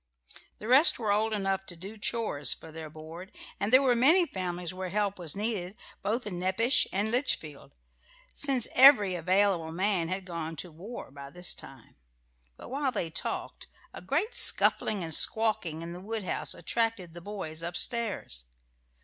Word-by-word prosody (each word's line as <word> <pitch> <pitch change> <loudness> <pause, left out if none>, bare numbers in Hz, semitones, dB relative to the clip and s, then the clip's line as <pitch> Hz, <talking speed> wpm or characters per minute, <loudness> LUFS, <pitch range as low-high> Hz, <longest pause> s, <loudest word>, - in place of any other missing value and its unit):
The 215 - -8
rest 270 +7 +6
were 215 -4 -1
old 215 +2 +1
enough 195 -2 -1
to 175 - -8
"do 195 +6 -9
chores" 215 -8 -1
for 160 - -13
their 160 -1 -8
board, 160 +5 -10 0.3
and 200 +2 -1
there 260 +2 +6
were 250 -2 +3
many 315 +10 +5
families 180 - -4
where 185 0 -5
help 200 0 -1
was 165 -4 -4
needed, 205 -3 -3 0.3
both 230 +4 -2
in 185 -4 -4
Nepash 190 +8 +2
and 205 +3 -1
Litchfield, 160 - -2 0.6
since 270 -5 +1
every 250 -8 +7
available 180 -1 +1
man 185 0 0
had 185 +2 -4
gone 165 -2 -5
to 180 - -4
the 155 - -20
war 200 - -9
by 140 0 -10
this 180 +4 -1
time. 130 - -13 0.6
But - - -11
while 275 0 -1
they 165 -8 -3
talked - - -5 0.3
a - - -8
great 320 - -1
scuffling 215 - +4
and 160 -1 -3
squawking 175 -6 +2
in 170 +1 -7
the 180 - -9
woodhouse 210 -2 -3
attracted 210 -1 -2
the 175 - -9
boys 165 -5 -6
upstairs. 175 - -2
190 Hz, 165 wpm, -29 LUFS, 170-225 Hz, 0.6 s, every